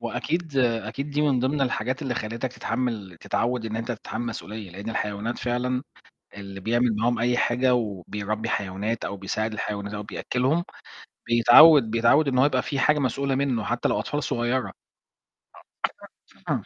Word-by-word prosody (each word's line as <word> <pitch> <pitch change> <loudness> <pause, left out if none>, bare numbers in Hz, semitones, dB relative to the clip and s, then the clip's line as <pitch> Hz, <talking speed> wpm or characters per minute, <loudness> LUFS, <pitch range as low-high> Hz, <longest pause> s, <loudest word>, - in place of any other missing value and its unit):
وأكيد 155 +6 -3
أكيد 120 +3 0
دي 145 +1 0
من 140 -4 +2
ضمن 135 +3 0
الحاجات 130 0 -1
اللي 130 -3 -2
خلتك 115 +4 -4
تتحمل 115 -8 -3
تتعود 120 -1 -1
إن 110 0 -4
أنت 115 +2 -3
تتحمل 110 0 -5
المسئولية، 110 -3 -6
لإن 100 +5 -6
الحيوانات 105 +2 -3
فعلًا 125 +1 -1 0.6
اللي 100 -1 -8
بيعمل 115 +3 +1
معاهم 120 +3 +1
أي 120 +1 +2
حاجة 125 +1 +2
وبيربّي 105 0 -3
حيوانات 100 +3 -2
أو 100 - -4
بيساعد 110 +3 -2
الحيوانات 100 -1 -4
أو 105 0 -4
بيأكّلهم، 130 +10 -1 0.6
بيتعود 120 +2 +7
بيتعود 115 +7 +4
إن 130 -2 +1
هو 130 - +5
يبقى 130 -3 +2
في 140 0 -3
حاجة 150 +2 +3
مسؤولة 135 +1 0
منه، 130 -5 0
حتى 120 +2 0
لو - - +1
أطفال 145 0 -2
صغيرة. 120 +2 -1 1.8
آه - - 0
120 Hz, 155 wpm, -25 LUFS, 110-130 Hz, 1.8 s, بيتعود